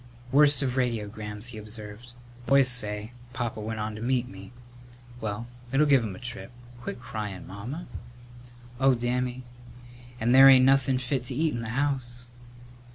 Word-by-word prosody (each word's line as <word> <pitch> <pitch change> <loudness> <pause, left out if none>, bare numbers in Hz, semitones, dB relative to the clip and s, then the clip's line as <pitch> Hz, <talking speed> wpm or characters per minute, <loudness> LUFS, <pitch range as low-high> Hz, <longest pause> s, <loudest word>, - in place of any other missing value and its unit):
"Worst 145 +1 +5
of 130 -1 -2
radiograms," 105 -2 -3
he 110 -3 -8
observed; 105 +2 -10 0.3
"the - - -8
boys 135 -1 +6
say 105 -3 0 0.2
Papa 120 -3 -3
went 110 +1 -4
on 105 0 -3
to 105 - -8
meet 125 0 0
me. 95 0 -11 0.7
Well, 105 +1 -4 0.3
it'll 140 +3 +4
give 135 -4 +4
him 105 -4 -5
a - - -11
trip. 125 0 -6 0.3
Quit 120 - -6
cryin', 110 -6 -6
Mamma." 120 - -7 0.9
"Oh, 135 -1 +4
Dammy, 125 +1 -2 0.8
and 120 +2 +2
there 135 +1 +9
ain't 130 -1 +7
nothin' 135 -1 +3
fit 130 0 -2
to 125 - -4
eat 155 +1 +1
in 120 - -3
the 115 - -5
house!" 125 -1 -2
120 Hz, 160 wpm, -27 LUFS, 110-130 Hz, 0.9 s, there